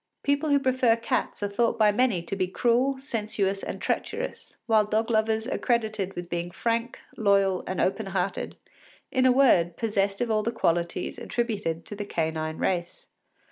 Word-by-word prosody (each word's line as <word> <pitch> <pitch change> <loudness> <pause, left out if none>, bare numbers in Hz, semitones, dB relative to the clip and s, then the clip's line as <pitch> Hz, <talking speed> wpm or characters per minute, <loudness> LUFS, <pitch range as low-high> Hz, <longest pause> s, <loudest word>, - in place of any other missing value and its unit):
People 285 +2 +1
who 285 - +5
prefer 255 -3 +3
cats 230 -2 -2
are - - +1
thought 230 +3 +1
by 215 -2 +5
many 215 -6 +1
to 170 - -4
be 185 -2 0
cruel, 245 +7 +2
sensuous, 210 -7 -2
and - - -5
treacherous, 465 +3 -3
while 220 -2 +4
dog 215 +2 0
lovers 220 0 +1
are - - -2
credited 215 -5 0
with 175 0 -5
being 175 0 -3
frank, 230 +6 -2 0.2
loyal, 195 -3 +3
and 185 - -3
open 195 +3 0
hearted, 190 0 -2 0.6
in 260 0 +3
a - - +6
word, 180 -11 +4
possessed 200 -3 0
of 240 -2 0
all 215 -1 +2
the 225 +2 -1
qualities 170 -5 -1
attributed 205 -9 -2
to 205 - -7
the 205 - -4
canine 160 -3 -2
race. 175 -2 -2
215 Hz, 175 wpm, -26 LUFS, 185-235 Hz, 0.6 s, a